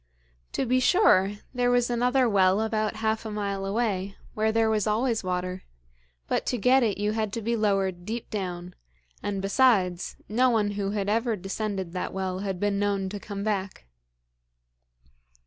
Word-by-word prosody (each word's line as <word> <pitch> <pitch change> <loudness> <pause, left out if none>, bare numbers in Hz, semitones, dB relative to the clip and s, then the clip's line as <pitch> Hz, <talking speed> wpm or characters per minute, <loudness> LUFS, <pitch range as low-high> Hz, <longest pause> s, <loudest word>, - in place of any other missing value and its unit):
To - - 0
be 255 +1 +2
sure, 205 - +4 0.2
there 245 -1 +1
was 245 -1 +3
another 250 +2 +2
well 195 -2 +4
about 215 -1 -1
half 220 0 +1
a 220 - -5
mile 200 -2 -3
away, 200 -2 -1 0.2
where 220 0 +1
there 225 0 +2
was 220 -1 +1
always 225 +1 +1
water; 185 0 -2 0.7
but - - 0
to 250 - 0
get 255 +5 +4
it 215 -5 +1
you 205 +1 0
had 215 -1 -1
to - - -2
be 235 +2 0
lowered 195 -4 0
deep 225 +4 -5
down, 180 -3 -4 0.5
and, 200 -1 -3
besides, 195 -5 +2
no 250 +4 +3
one 215 -3 +1
who 200 -1 -2
had 200 -1 -2
ever 225 +2 +1
descended 195 -2 -4
that 180 - -3
well 185 -1 -2
had 195 -2 -3
been 205 0 0
known 200 -2 0
to 205 +1 -6
come 200 0 -6
back. 195 - -3
205 Hz, 170 wpm, -26 LUFS, 195-225 Hz, 0.7 s, sure